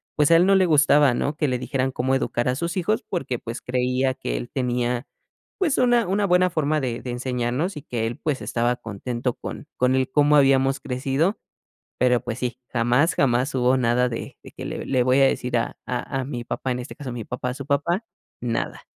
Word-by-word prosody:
pues 150 0 +3
a - - +8
él 175 - +5
no 195 - +4
le 190 -1 +5
gustaba, 145 -3 +5
¿no?, 145 +4 -1
que 150 - +1
le 125 -2 0
dijeran 130 0 -1
cómo 130 +1 -1
educar 120 -2 -1
a 125 - +1
sus 170 +5 -3
hijos, 210 +5 0
porque 130 -9 -2
pues, 115 +1 -6
creía 125 +1 0
que - - -4
él - - -6
tenía, 125 -1 -1 0.5
pues 320 -7 +1
una 240 -4 +3
una 200 +2 +1
buena 180 +1 +4
forma 155 -1 +1
de 120 -2 -3
de 125 - -7
enseñarnos 125 +7 -2
y - - -6
que 115 -6 -2
él, 120 - -5
pues 145 -4 -2
estaba 120 +1 0
contento 120 +3 -3
con 150 - -8
con 125 +1 +2
el 130 0 +1
cómo 145 +1 +4
habíamos 135 -1 +4
crecido. 135 +9 -1 0.6
Pero 125 -1 +3
pues 120 0 -4
sí, 125 -1 -3
jamás, 125 +7 +2
jamás 130 +1 +2
hubo 130 +1 +3
nada 125 0 +2
de 115 - -6
de - - -12
que: - - -8
"Le - - -5
le 130 -2 +2
voy 130 +2 +4
a 135 - +7
decir 125 -2 0
a 115 - -3
a 130 +1 -3
a - - -3
mi 125 -3 -5
papá" 130 - -3
en 125 - -3
este 125 - -8
caso 135 -5 -6
mi 115 -3 -5
papá 125 0 -4
a 125 - -4
su 140 - -7
papá: 170 +9 0 0.4
"Nada". 115 -2 -2
130 Hz, 220 wpm, -23 LUFS, 125-150 Hz, 0.6 s, a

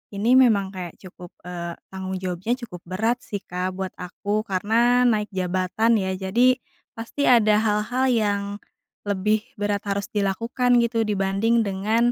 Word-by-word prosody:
ini 215 +4 +1
memang 200 -6 +3
kayak 180 -3 -6
cukup 180 -2 -12
eee, 170 -1 -5 0.2
tanggung 190 0 -5
jawabnya 185 +5 -2
cukup 180 -4 -10
berat 225 +7 0
sih 205 -2 -5
Kak 180 +1 -3
buat 190 0 -4
aku, 205 +4 -3
karena 230 +6 +2
naik 215 -3 +1
jabatan 185 +5 +1
ya. 190 -1 -1
Jadi, 230 +7 +3 0.4
pasti 230 +5 -3
ada 215 -5 +5
hal-hal 220 +4 +1
yang 205 -4 +1 0.7
lebih 205 +2 +1
berat 205 0 -1
harus 200 0 -2
dilakukan 235 +5 +1
gitu 230 -2 0
dibanding 210 +3 +1
dengan 215 +5 +1
205 Hz, 145 wpm, -23 LUFS, 190-230 Hz, 0.7 s, ada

